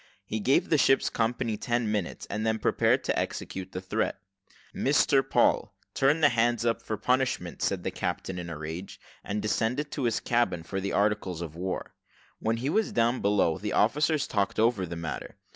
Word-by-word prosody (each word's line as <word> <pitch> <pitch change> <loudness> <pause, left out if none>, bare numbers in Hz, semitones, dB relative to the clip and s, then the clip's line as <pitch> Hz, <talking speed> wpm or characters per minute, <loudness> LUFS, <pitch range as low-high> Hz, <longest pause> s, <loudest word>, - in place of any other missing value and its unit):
He 110 - -3
gave 130 +6 +2
the 155 - +4
ship's 135 - +3
company 115 -1 -1
ten 120 -2 -1
minutes, 105 -5 -3
and 105 +2 -3
then 110 0 +1
prepared - - +2
to - - 0
execute 95 0 -4
the 90 - -5
threat. 95 - -1 0.6
"Mr - - +3
Paul, - - +2 0.2
turn 145 +4 +3
the 145 - +7
hands 120 0 +1
up 115 -1 +1
for 110 - -4
punishment," 130 +3 0
said - - 0
the - - -2
captain 95 -1 -3
in 85 -1 -6
a 80 - -5
rage, 80 +5 -6 0.2
and 105 +1 -3
descended 115 +8 0
to 135 - -2
his 115 - +1
cabin 120 -8 0
for 95 +3 -4
the 100 - -2
articles 100 -4 0
of 80 -2 -8
war. 90 +2 -4 0.5
When 115 +1 0
he 125 +4 -3
was 220 +2 +1
down 120 +2 +1
below, 100 -4 +2
the 105 +1 -3
officers 150 +7 +2
talked 100 -2 -1
over 110 -4 +2
the 85 - -5
matter. 85 -1 -6
110 Hz, 190 wpm, -28 LUFS, 95-120 Hz, 0.6 s, the